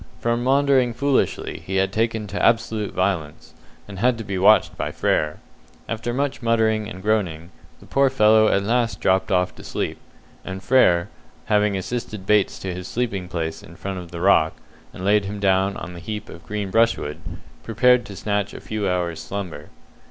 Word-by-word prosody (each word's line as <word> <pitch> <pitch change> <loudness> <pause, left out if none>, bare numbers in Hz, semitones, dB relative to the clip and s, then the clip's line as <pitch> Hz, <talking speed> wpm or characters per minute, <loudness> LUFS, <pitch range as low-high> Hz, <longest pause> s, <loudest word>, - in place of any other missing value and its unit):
From 120 +1 0
maundering 135 -2 +3
foolishly 140 0 0
he 95 - -4
had 95 0 +1
taken 110 0 0
to 100 0 -4
absolute 115 -2 +1
violence, 90 -6 -2 0.3
and 100 -2 -8
had 125 +2 +2
to 115 - -5
be 100 -2 -3
watched 105 +3 +5
by - - -3
Frere. 75 0 0 0.5
After 115 +1 -3
much 140 +2 -2
muttering 110 -2 +1
and 95 +1 -9
groaning, 90 -6 -1 0.3
the - - -16
poor 135 0 +3
fellow 110 -1 +5
at 100 - +2
last 115 +2 0
dropped 95 0 +1
off 90 -1 +2
to - - -11
sleep, - - -3 0.4
and 95 0 -7
Frere, 90 -10 +4 0.4
having 105 -1 +2
assisted 105 -1 -5
Bates 105 -1 +2
to 95 -2 -5
his 90 +1 -7
sleeping 110 -7 -2
place 80 -2 -4
in 85 - -14
front 95 0 -5
of 90 -1 -9
the 85 0 -7
rock, 85 -4 +4 0.4
and 90 - -7
laid 105 0 +3
him 100 +1 -5
down 95 0 +2
on 90 - -7
a - - -8
heap 105 +4 -6
of 85 - -12
green 105 -2 -3
brushwood, 115 -9 +1 0.4
prepared 125 +2 +3
to 100 - -9
snatch 100 0 -2
a - - -7
few 105 -3 -3
hours' 90 -2 -1
slumber. 90 -7 -6
100 Hz, 180 wpm, -22 LUFS, 95-115 Hz, 0.5 s, watched